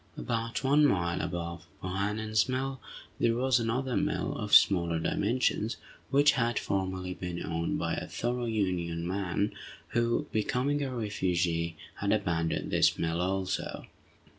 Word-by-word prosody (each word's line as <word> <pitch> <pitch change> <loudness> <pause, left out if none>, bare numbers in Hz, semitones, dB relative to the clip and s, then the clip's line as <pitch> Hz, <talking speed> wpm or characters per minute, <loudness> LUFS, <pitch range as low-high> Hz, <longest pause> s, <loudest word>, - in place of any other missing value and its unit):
About 115 0 -2
one 145 +3 +4
mile 90 -9 +2
above 85 -1 -4 0.2
Bohannan's 105 +4 0
mill, 130 +1 -2 0.4
there 115 - +3
was 130 +1 +3
another 125 +3 -1
mill, - - 0
of 105 0 +3
smaller 85 -4 +5
dimensions, 110 +5 0 0.3
which 145 +2 +5
had 120 -3 0
formerly 95 -1 -2
been 90 -1 -5
owned 85 +1 -1
by - - -1
a - - -3
thorough 120 +1 -2
Union 90 -6 -1
man, 100 +2 -1 0.4
who, 120 0 +1
becoming 130 +6 0
a 140 - -1
refugee, 90 -6 0 0.2
had 100 - 0
abandoned 85 -6 0
this - - +4
mill, 85 +1 0
also. 95 +1 -2
100 Hz, 135 wpm, -30 LUFS, 90-120 Hz, 0.4 s, smaller